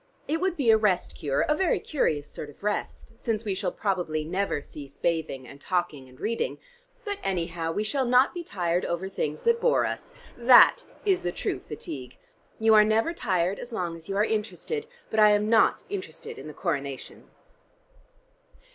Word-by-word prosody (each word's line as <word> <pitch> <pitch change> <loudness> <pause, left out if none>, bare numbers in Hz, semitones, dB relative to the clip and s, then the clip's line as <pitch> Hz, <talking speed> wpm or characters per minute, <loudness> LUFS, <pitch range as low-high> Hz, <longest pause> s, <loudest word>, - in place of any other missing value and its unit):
It 320 +2 -1
would 370 -2 0
be 250 -6 +4
a 220 - +6
rest 205 -5 +1
cure; 140 -2 0
a 300 - +2
very 370 +1 +1
curious 150 - -1
sort 150 - -8
of 145 - -17
rest, 210 +2 -3
since 225 -1 -2
we 200 - 0
shall 190 -1 -2
probably 175 -7 -1
never 185 0 -1
cease 140 -1 -10
bathing 160 -6 -1
and 140 +3 -13
talking 175 -8 -2
and 130 - -18
reading. 230 +2 -2 0.5
But 405 -1 -3
anyhow 170 -3 -2
we 210 - -1
shall 260 +5 0
not 250 +2 +4
be 350 -1 -5
tired 175 - -1
over 170 +3 -2
things 150 -5 -3
that 470 0 +3
bore 485 - +3
us. - - -5 0.2
That 245 - +7 0.2
is 385 -3 +3
the 175 - -1
true - - -3
fatigue. 140 -4 -8 0.4
You 220 0 +4
are 215 -1 +8
never 220 +9 +2
tired 185 - 0
as 245 - -7
long 175 -6 -3
as 165 +2 -11
you 195 - -1
are 210 - +4
interested, 220 - -3 0.2
but 220 - +1
I 210 0 +8
am 210 +1 +1
not 225 - +4
interested 420 +3 -6
in - - -9
the 150 - -8
Coronation." 140 -7 -4
200 Hz, 185 wpm, -27 LUFS, 165-240 Hz, 0.5 s, are